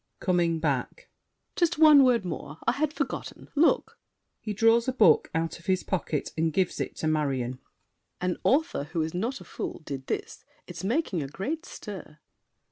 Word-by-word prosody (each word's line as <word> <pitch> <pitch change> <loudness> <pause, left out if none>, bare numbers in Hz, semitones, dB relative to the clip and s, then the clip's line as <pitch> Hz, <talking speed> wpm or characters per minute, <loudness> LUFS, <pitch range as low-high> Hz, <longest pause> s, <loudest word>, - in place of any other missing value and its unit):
[Coming 175 -3 +1
back. 160 - -2 0.4
Just 345 -3 +1
one 305 -3 +8
word 240 -6 +3
more! 160 -3 -6
I - - +4
had 305 +1 0
forgotten. 280 -3 -5
Look! 315 +3 +2 0.4
[He 215 - -5
draws 225 +3 +3
a 260 - +1
book 210 -11 +5
out 165 +1 -1
of 170 - -18
his 185 -1 +1
pocket 165 -5 -2
and 160 0 +1
gives 185 +2 0
it - - -3
to 155 - -2
Marion. 135 -5 -1 0.6
An 180 0 -1
author 295 - +2
who 160 +1 -2
is 160 - -4
not 230 +10 -2
a - - -11
fool, - - -6
did 135 -2 -6
this. - - -4 0.2
It's - - -8
making 215 - 0
a 140 - -4
great 300 - -4
stir. 185 -7 -9
185 Hz, 175 wpm, -27 LUFS, 155-260 Hz, 0.6 s, one